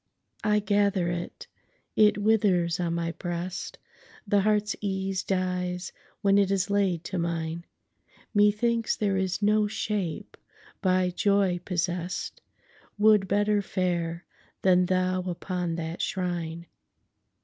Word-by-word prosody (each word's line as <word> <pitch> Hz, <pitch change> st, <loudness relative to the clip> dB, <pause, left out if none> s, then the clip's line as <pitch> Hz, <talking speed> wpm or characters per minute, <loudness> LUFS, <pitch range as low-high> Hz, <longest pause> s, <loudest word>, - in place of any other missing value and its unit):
I 210 Hz, 0 st, +3 dB
gather 200 Hz, -3 st, +1 dB
it—It 210 Hz, -, -1 dB
withers 200 Hz, -5 st, +2 dB
on 170 Hz, -1 st, -1 dB
my 170 Hz, 0 st, -1 dB
breast; 175 Hz, +1 st, -5 dB, 0.5 s
The 205 Hz, -1 st, +3 dB
heart's 210 Hz, 0 st, +1 dB
ease 190 Hz, -1 st, -1 dB
dies 180 Hz, -1 st, -2 dB, 0.3 s
when 200 Hz, -1 st, +4 dB
it 200 Hz, -1 st, +3 dB
is 195 Hz, 0 st, 0 dB
laid 190 Hz, -5 st, +1 dB
to 185 Hz, -1 st, -3 dB
mine; 170 Hz, 0 st, -3 dB, 0.7 s
Methinks 215 Hz, +2 st, +2 dB
there 200 Hz, -2 st, 0 dB
is 190 Hz, +1 st, -1 dB
no 210 Hz, 0 st, +3 dB
shape 205 Hz, -6 st, -3 dB, 0.4 s
by 185 Hz, -1 st, +2 dB
joy 195 Hz, -1 st, +2 dB
possess'dWould 185 Hz, +3 st, -1 dB
better 205 Hz, +1 st, +2 dB
fare 175 Hz, -3 st, -2 dB, 0.4 s
than 180 Hz, -1 st, +4 dB
thou 185 Hz, 0 st, +1 dB
upon 180 Hz, -1 st, -3 dB
that 165 Hz, 0 st, -4 dB
shrine. 170 Hz, -3 st, -3 dB
185 Hz, 110 wpm, -27 LUFS, 175-205 Hz, 0.7 s, when